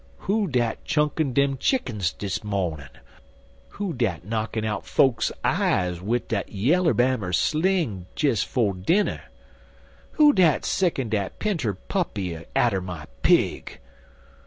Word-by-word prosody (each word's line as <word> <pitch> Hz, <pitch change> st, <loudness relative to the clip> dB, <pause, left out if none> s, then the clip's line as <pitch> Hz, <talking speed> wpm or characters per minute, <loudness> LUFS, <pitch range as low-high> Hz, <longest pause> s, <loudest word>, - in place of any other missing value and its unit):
"Who 205 Hz, +1 st, 0 dB
dat 120 Hz, -6 st, -1 dB
chunkin' 150 Hz, 0 st, 0 dB
dem 140 Hz, -1 st, +2 dB
chickens 110 Hz, -, 0 dB
dis 100 Hz, 0 st, -4 dB
mawnin? 90 Hz, -9 st, -3 dB, 0.9 s
Who 200 Hz, -4 st, -2 dB
dat 100 Hz, -, -2 dB
knockin' 110 Hz, +1 st, -2 dB
out 105 Hz, -1 st, -2 dB
fokes's 130 Hz, -4 st, +2 dB
eyes 90 Hz, -1 st, +1 dB
wid 115 Hz, +5 st, -1 dB
dat 100 Hz, -3 st, -2 dB
Yallerbammer 125 Hz, -, +1 dB
sling 155 Hz, -, 0 dB
des 140 Hz, -7 st, +1 dB
'fo' 110 Hz, -6 st, 0 dB
dinner? 165 Hz, -, 0 dB, 0.9 s
Who 300 Hz, -2 st, +6 dB
dat 170 Hz, -, +3 dB
sickin' 160 Hz, -10 st, 0 dB
dat 100 Hz, -3 st, -2 dB
pinter 165 Hz, -, -1 dB
puppy 100 Hz, -, -3 dB, 0.2 s
atter 105 Hz, -6 st, +2 dB
my 90 Hz, -4 st, -7 dB, 0.2 s
pig? -, -, +2 dB
120 Hz, 120 wpm, -24 LUFS, 100-160 Hz, 0.9 s, Who